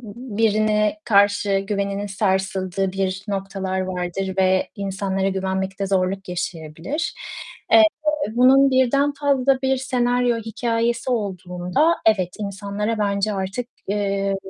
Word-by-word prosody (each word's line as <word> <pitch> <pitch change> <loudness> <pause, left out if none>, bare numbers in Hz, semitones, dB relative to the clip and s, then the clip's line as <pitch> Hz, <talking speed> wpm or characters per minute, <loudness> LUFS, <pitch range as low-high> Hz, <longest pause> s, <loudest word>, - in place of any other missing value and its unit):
birine 215 0 +1
karşı 200 -1 +3
güveninin 200 0 -2
sarsıldığı 190 -1 -1
bir 190 0 -2
noktalar 195 -1 -3
vardır 185 +1 -3
ve 185 0 +2
insanlara 195 -1 -1
güvenmekte 190 0 -2
zorluk 195 0 -1
yaşayabilir. 170 - -4 0.6
Eee, 335 - +8 0.5
bunun 265 +3 +5
birden 275 +3 +3
fazla 275 -2 +1
bir 265 0 +1
senaryo 245 -2 +1
hikâyesi 230 +2 -1
olduğunda, 190 - 0
evet, 195 -5 +3
insanlara 205 +2 -3
bence 200 0 0
artık, 195 +5 -3 0.2
eee, 200 -1 0
200 Hz, 105 wpm, -22 LUFS, 190-235 Hz, 0.6 s, Eee